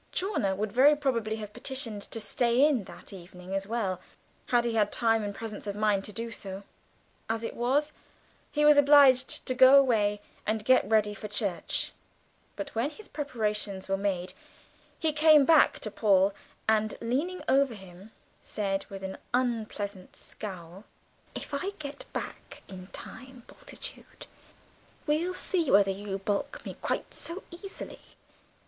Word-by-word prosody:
Chawner 360 - 0
would 205 +1 -2
very 275 +6 +6
probably 235 -7 -1
have 210 -1 -8
petitioned 240 -6 -3
to 225 - -4
stay 235 +4 +2
in 255 -10 0
that - - -11
evening 180 0 -10
as 195 0 -2
well, 200 -5 -2 0.5
had 240 -1 +2
he 235 - 0
had 210 -2 +2
time 225 -2 +2
and 205 -1 -4
presence 215 -2 -6
of 200 - -3
mind 210 -2 +1
to - - -6
do 230 +2 -5
so; 195 -2 -7 0.7
as 225 0 -1
it - - -4
was, 280 +5 +1 0.6
he 295 0 +2
was 300 -1 +7
obliged 275 -3 +5
to 255 - 0
go 260 +2 +8
away 215 -6 +3 0.2
and 215 0 -2
get 255 -5 +4
ready 215 -2 +3
for 210 +1 -7
church, 205 -3 -2 0.6
but 290 -1 -6
when 230 +5 0
his 425 +7 -13
preparations 210 -9 -3
were 195 - +1
made 190 -2 -2 0.6
he 315 -2 0
came 305 -2 +6
back 320 0 +5
to 215 - -5
Paul, 200 -2 +3 0.3
and 215 -1 +2
leaning 285 +11 -2
over 270 -2 +3
him 190 +1 -13 0.3
said 195 -2 -3
with 195 -1 -8
an 190 0 -5 0.2
unpleasant 215 -6 -2
scowl, 185 -2 -8 0.5
"If - - -7
I 370 +8 -2
get 285 -1 -8
back - - -7
in 185 -1 -10
time, 255 +4 -11
Bultitude, - - -10 0.8
we'll 330 +5 0
see 345 -7 0
whether 195 -1 +5
you 195 0 -4
baulk 200 +1 -3
me - - -6
quite - - -2
so 345 +4 -4
easily. 385 +3 -8
220 Hz, 155 wpm, -29 LUFS, 200-275 Hz, 0.8 s, go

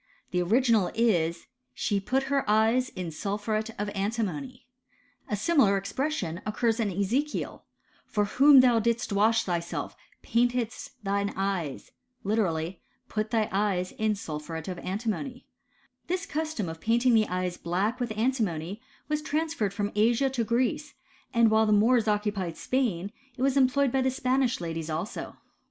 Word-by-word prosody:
The 180 - +1
original 225 +1 +3
is, 170 -8 +1 0.3
she 205 -2 0
put 260 +7 0
her 275 0 0
eyes 225 +4 +3
in 180 -3 -5
sulphuret 210 +5 -2
of 205 - -2
antimony 230 +5 -3 0.3
* 280 -1 -34
A 210 - 0
similar 210 - +3
expression 200 - -2
occurs 225 +2 0
in 220 -3 +1
Ezekiel, 215 +11 -2 0.2
" - - -36
For 210 -1 +1
whom 275 +5 +7
thou 245 -3 +4
didst 230 -1 0
wash 220 +3 +3
thyself, 170 -2 -3 0.3
paintedst 245 +3 0
thy 200 0 0
eyes" 190 -8 -3 0.2
— 250 -3 -37
^literally, 180 -5 0 0.3
put 215 0 -2
thy 220 -2 +1
eyes 195 -2 0
in 220 -1 0
sulphuret 160 -3 -6
of 180 -2 -4
antimony, 235 +6 -4 0.6
f 360 - +2
^This - - -9
custom 310 - -2
of 160 0 -7
painting 235 +2 +3
the 220 -1 +4
eyes 180 -1 -2
black 200 +8 -1
with 245 -2 -2
antimony 210 -6 -1 0.3
was 300 0 -1
trans* 310 +2 -1
ferred 210 - -1
from 205 0 -2
Asia 235 +6 +3
to 245 -3 0
Greece, 255 +6 -1 0.4
and 235 -2 +4
while 220 0 +4
the - - +2
Moors 225 +2 +4
oc 210 -1 +2
cupied 190 -6 -2
Spain 205 -8 -1 0.3
it 255 - -2
was 275 0 +2
employed 275 0 +3
by 265 - +2
the 260 - +2
Spanish 255 -1 +1
ladies 165 -2 -4
also. 160 +6 -4
220 Hz, 160 wpm, -28 LUFS, 195-255 Hz, 0.6 s, whom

